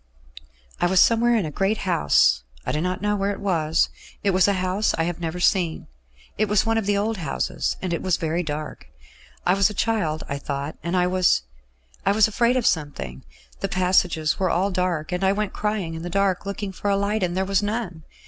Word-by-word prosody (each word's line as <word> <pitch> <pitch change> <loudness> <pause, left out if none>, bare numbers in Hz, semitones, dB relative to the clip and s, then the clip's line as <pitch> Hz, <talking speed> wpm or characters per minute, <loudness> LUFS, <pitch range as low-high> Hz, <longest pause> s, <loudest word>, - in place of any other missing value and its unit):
"I 175 - +3
was 185 +1 +3
somewhere 235 +3 +4
in 215 -6 +1
a 155 - -4
great 195 +7 0
house; 170 - +3 0.2
I - - -1
do 150 - -1
not 185 +2 -2
know 210 0 +1
where 200 0 0
it 200 - -3
was. 165 -5 +1 0.3
It 200 - +3
was 185 0 +4
a 200 - +3
house 185 +2 0
I 165 - +1
have 175 0 -3
never 170 +1 -4
seen. 180 -3 +1 0.5
It 215 -1 +2
was 210 -1 +3
one 225 0 +2
of 210 - -4
the 205 -1 +2
old 215 +2 -1
houses, 155 -7 -2
and 180 -2 -1
it 170 - -2
was 185 -3 +1
very 165 +2 -1
dark. 150 - -5 0.6
I 180 - +4
was 195 +1 +3
a 210 - -7
child, 185 -9 0
I 140 -1 -3
thought, 140 +1 -4
and 170 +2 -1
I 180 - +3
was... 180 - +2 0.6
I 200 - +3
was 215 0 +5
afraid 235 +3 +2
of 245 - 0
something. 145 - -1 0.4
The 195 - -2
passages 180 -4 +1
were 185 -1 +1
all 190 +4 +1
dark, 180 -4 -1
and 180 +1 -2
I 190 0 +4
went 210 -1 -2
crying 210 -6 -2
in 160 - -6
the 175 - -5
dark, 195 +1 0
looking 200 0 -4
for 205 +2 -3
a 200 - +2
light, 205 +2 0
and 180 -1 -1
there 190 - +1
was 195 0 +1
none. 205 -6 -3
185 Hz, 225 wpm, -23 LUFS, 170-205 Hz, 0.6 s, was